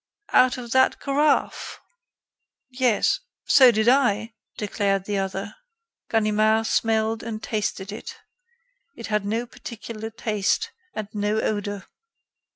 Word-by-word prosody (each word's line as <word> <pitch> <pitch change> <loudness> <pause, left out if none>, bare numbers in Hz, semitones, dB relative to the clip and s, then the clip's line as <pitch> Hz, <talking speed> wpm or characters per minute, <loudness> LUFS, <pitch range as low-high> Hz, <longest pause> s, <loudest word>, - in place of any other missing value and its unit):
"Out 255 +1 +5
of 240 -2 -8
that 260 +1 +3
carafe?" 290 +2 0 0.9
"Yes." 250 -3 +2 0.3
"So 260 -3 +7
did 220 -1 +1
I," 230 -4 +3 0.2
declared 200 -2 -1
the 205 -1 -1
other. 195 +1 -4 0.6
Ganimard 220 0 +2
smelled 225 0 +1
and 220 -1 -6
tasted 210 -2 -3
it. 465 - -8 0.8
It 230 - -8
had 210 -1 +1
no 225 +3 -1
particular 225 -2 -8
taste 220 - -1 0.2
and 215 - -4
no 210 +1 0
odor. 205 -2 -2
220 Hz, 115 wpm, -24 LUFS, 210-235 Hz, 0.9 s, So